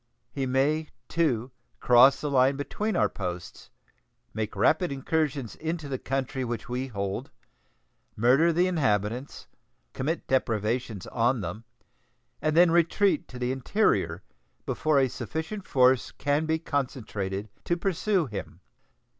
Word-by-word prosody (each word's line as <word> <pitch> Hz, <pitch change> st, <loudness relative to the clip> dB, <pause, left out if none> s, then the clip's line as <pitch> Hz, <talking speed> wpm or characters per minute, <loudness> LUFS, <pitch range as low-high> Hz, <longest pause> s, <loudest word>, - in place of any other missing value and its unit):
He 135 Hz, -2 st, -2 dB
may, 145 Hz, +5 st, +1 dB, 0.2 s
too, 130 Hz, -7 st, 0 dB, 0.3 s
cross 125 Hz, +2 st, +6 dB
the 150 Hz, -, -2 dB
line 135 Hz, 0 st, +4 dB
between 205 Hz, +10 st, -3 dB
our -, -, +3 dB
posts, 90 Hz, -3 st, -6 dB, 0.6 s
make 110 Hz, 0 st, -3 dB
rapid 155 Hz, -, +2 dB
incursions 140 Hz, -2 st, -1 dB
into 160 Hz, -1 st, -3 dB
the 130 Hz, -2 st, -3 dB
country 135 Hz, 0 st, -2 dB
which 120 Hz, -1 st, -4 dB
we 125 Hz, +2 st, -3 dB
hold, 100 Hz, -5 st, -4 dB, 0.9 s
murder 130 Hz, +10 st, +4 dB
the 175 Hz, +2 st, +3 dB
inhabitants, 125 Hz, -, -1 dB, 0.5 s
commit 155 Hz, +6 st, -2 dB
depredations 115 Hz, -4 st, -1 dB
on 120 Hz, 0 st, +1 dB
them, 105 Hz, +6 st, -6 dB, 0.8 s
and 155 Hz, +1 st, +1 dB
then 175 Hz, -1 st, +7 dB
retreat 170 Hz, +2 st, +2 dB
to 125 Hz, -, -10 dB
the 125 Hz, 0 st, -1 dB
interior 105 Hz, -, +1 dB, 0.4 s
before 155 Hz, -2 st, +1 dB
a 135 Hz, -1 st, +4 dB
sufficient 160 Hz, -, -5 dB
force 130 Hz, -1 st, +4 dB
can 145 Hz, +2 st, 0 dB
be 160 Hz, 0 st, +2 dB
concentrated 110 Hz, -, -3 dB, 0.2 s
to 170 Hz, -, +1 dB
pursue 190 Hz, 0 st, +1 dB
him. 105 Hz, -7 st, -7 dB
135 Hz, 130 wpm, -27 LUFS, 115-160 Hz, 0.9 s, then